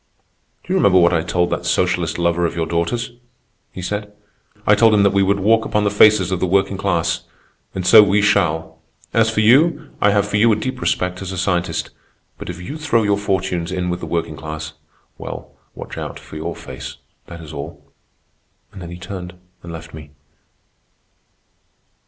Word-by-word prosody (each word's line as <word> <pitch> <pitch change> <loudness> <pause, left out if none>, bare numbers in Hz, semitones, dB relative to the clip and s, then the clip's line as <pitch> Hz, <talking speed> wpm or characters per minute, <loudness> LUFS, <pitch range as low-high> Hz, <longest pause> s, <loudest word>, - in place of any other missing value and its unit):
"'Do 180 - -3
you - - +3
remember 95 - +5
what 85 0 +4
I 80 - +2
told 90 +1 0
that - - -2
socialist 90 -3 0
lover 85 0 +1
of 85 - -7
your 85 -1 -1
daughter's?' 85 +10 -2 0.6
he 90 - -8
said. 105 +2 -4 0.5
'I 105 - +5
told 110 +1 +5
him 100 - +4
that 100 - +3
we 100 - +3
would 100 +1 +2
walk 110 +3 +3
upon 105 -1 0
the 100 - +1
faces 105 -3 +5
of 95 - -1
the 95 - 0
working 95 +2 +1
class. 95 -4 -1 0.5
And 95 -1 -3
so 110 +3 +9
we 105 0 +3
shall. 80 -5 +1 0.3
As 115 -1 +3
for 110 -1 0
you, 145 +7 +3
I 105 - +5
have 100 0 +2
for 105 - 0
you 115 +2 +5
a - - +4
deep 130 +4 -4
respect 90 0 -1
as 95 -1 -5
a 95 - -5
scientist; 90 -1 -1 0.5
but - - -7
if 90 0 -6
you 145 - -7
throw 120 -8 +1
your 100 -1 +1
fortunes 95 -4 -1
in 90 -1 -2
with 90 - -3
the - - -6
working 85 -2 -2
class—well, 80 0 -9 0.2
watch - - -8
out - - -6
for - - -13
your 75 - -4
face, - - -8 0.3
that 85 - -9
is 80 -2 -10
all.' 70 -1 -8 0.9
And 95 - -10
then 85 - -7
he 85 - -8
turned 90 0 -8 0.3
and 85 - -9
left 80 0 -9
me." 75 -2 -10
95 Hz, 195 wpm, -19 LUFS, 85-105 Hz, 0.9 s, so